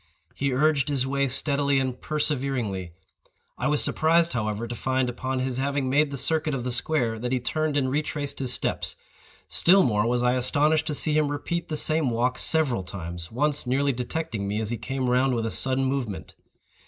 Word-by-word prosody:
He 140 0 -1
urged 140 0 +2
his 135 -3 +1
way 140 +1 0
steadily 140 +1 0
and 130 -2 -2
perseveringly. 130 - -2 0.6
I - - -2
was 150 -1 +4
surprised, 165 +1 +2
however, 110 -1 -2
to 120 - -5
find, 130 +1 -1
upon 130 +2 -3
his 130 -1 -2
having 135 -1 -1
made 150 +2 +3
the 140 - -5
circuit 155 +1 +1
of 125 - -4
the 125 - -2
square, 120 -3 0
that 125 +2 -3
he 130 - +1
turned 155 +4 -1
and 135 -2 +1
retraced 145 +1 -2
his 130 -2 +1
steps. - - 0 0.5
Still 190 +2 +5
more 105 -1 +1
was 120 0 +1
I 125 0 +3
astonished 150 +5 +1
to 150 - -1
see 155 +2 +1
him 155 -1 +3
repeat 170 +4 -3
the 155 - -3
same 155 -2 +1
walk 120 +2 0
several 145 - +2
times—once 95 - -3
nearly 140 +3 +2
detecting 125 -3 -3
me 105 +2 -2
as 110 0 -2
he 120 - -2
came 130 +1 -3
round 125 +1 +2
with 115 -1 -1
a 115 - -2
sudden 130 0 +3
movement. 130 -7 -3
130 Hz, 190 wpm, -25 LUFS, 120-150 Hz, 0.6 s, Still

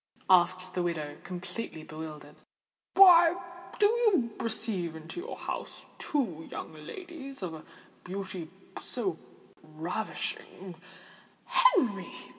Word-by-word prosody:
asked 185 0 +4
the 180 - 0
widow, 160 -4 -2
completely 180 -2 -5
bewildered. 155 -1 -8 0.6
"Why 350 -3 +9 0.4
do 420 - +5
you 415 - +3
receive 215 -7 -1
into 160 - -7
your 435 +7 -6
house - - -5
two 185 - -1
young - - -6
ladies 275 - -8
of 175 -3 -3
a 155 - -8 0.4
beauty 185 -3 -5 0.3
so 195 -9 -2 0.4
ravishing——" 175 +3 -4 0.7
"Henry! - - +4
190 Hz, 100 wpm, -30 LUFS, -, 0.7 s, Why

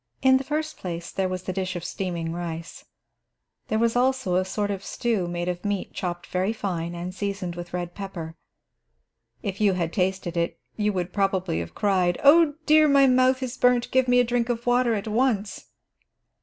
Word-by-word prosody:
In 260 0 +6
the 265 - -3
first 310 +2 -3
place, 170 -2 -5
there 190 -1 -1
was 185 0 -4
the 185 - -3
dish 185 -1 -3
of 175 - -4
steaming 170 -4 -3
rice. 170 -1 -6 0.8
There 220 - 0
was 230 +1 +2
also 255 -5 +1
a 185 +1 +3
sort 205 +2 -2
of 195 -1 -4
stew 220 -6 -1
made 175 0 -3
of 175 -1 -3
meat 205 -2 -2
chopped 175 -1 -4
very 185 +4 -1
fine 175 -5 -3
and 175 +2 -5
seasoned 195 -3 -3
with 175 0 -7
red 175 -1 -4
pepper. 175 -5 -7 1.1
If 200 -1 -4
you 205 -2 +4
had 170 -2 -2
tasted 190 -2 -1
it, 170 0 -1 0.2
you 210 -1 +1
would 180 -2 -3
probably 195 - 0
have 85 0 -7
cried: 185 -4 +1
"Oh 295 +1 +6
dear, 310 0 +6
my 280 -1 +6
mouth 255 0 +3
is 255 +1 -5
burnt; 250 -1 +3
give 260 0 +3
me 245 0 +5
a - - +5
drink 240 0 0
of 235 -1 -2
water 245 -1 +3
at 205 +1 -4
once." 220 -2 0
195 Hz, 195 wpm, -25 LUFS, 175-245 Hz, 1.1 s, In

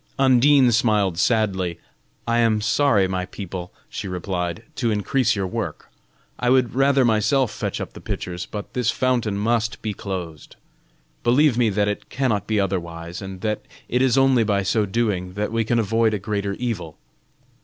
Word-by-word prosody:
Undine 130 0 +5
smiled 105 -6 +2
sadly. 95 -6 +1 0.5
"I 115 0 +2
am 115 -2 +3
sorry, 110 -2 +3
my 90 -1 -3
people," 90 -2 -7 0.2
she 100 - -6
replied, 90 +1 -3
"to 120 -3 0
increase 110 +3 +1
your 100 -2 -1
work. 90 - -5 0.5
I 125 - +1
would 130 -2 +3
rather 135 0 +3
myself 115 +2 +2
fetch - - -4
up - - -6
the - - -11
pitchers, 90 0 -5
but 105 -1 -7
this 125 -2 0
fountain 120 -5 0
must 110 +1 0
be 110 -1 -2
closed. 90 -7 -6 0.7
Believe 125 +3 +4
me 120 -2 +3
that 105 0 +1
it 105 - -4
cannot 110 -7 -1
be 110 -1 +1
otherwise, 85 -3 -3
and 95 -1 -8
that 105 0 -1 0.3
it 125 - +1
is 130 0 +3
only 135 -3 +4
by 100 -2 +1
so 105 +2 +1
doing 95 -4 -1
that 105 +2 -2
we 115 0 +1
can 120 +2 0
avoid 115 0 +2
a - - -1
greater 100 0 -2
evil." 100 -9 -4
105 Hz, 170 wpm, -22 LUFS, 95-120 Hz, 0.7 s, Undine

